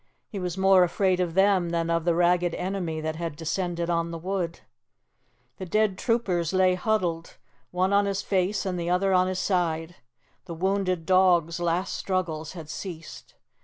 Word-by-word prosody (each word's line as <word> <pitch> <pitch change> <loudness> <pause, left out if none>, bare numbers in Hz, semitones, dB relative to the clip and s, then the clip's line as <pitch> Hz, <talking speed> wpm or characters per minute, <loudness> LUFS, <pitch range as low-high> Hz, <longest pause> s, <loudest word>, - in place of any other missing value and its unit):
He 205 - -6
was 180 0 -4
more 190 -1 +5
afraid 185 +1 +1
of 175 -2 -1
them 190 -3 +3
than 170 0 -1
of 165 -1 0
the 170 -1 +2
ragged 175 0 +2
enemy 180 -4 -3
that 155 0 -3
had 165 -3 -4
descended 170 +2 -2
on 170 -1 0
the 170 - -5
wood. 175 -1 -3 1.0
The 190 - -6
dead 210 +1 +1
troopers 190 -7 0
lay 185 -1 +4
huddled, 180 -4 -1 0.3
one 185 +2 0
on 200 0 +3
his 195 -1 -2
face 195 +1 0
and 180 -2 -2
the 170 0 -2
other 190 +2 +2
on 185 0 +4
his 185 0 -2
side; 175 -3 -1 0.5
the 170 -3 -7
wounded 185 -1 -1
dog's 175 -2 +3
last 175 +2 -1
struggles 165 -5 -3
had 165 -4 -9
ceased. 165 0 -8
180 Hz, 170 wpm, -26 LUFS, 170-190 Hz, 1.0 s, more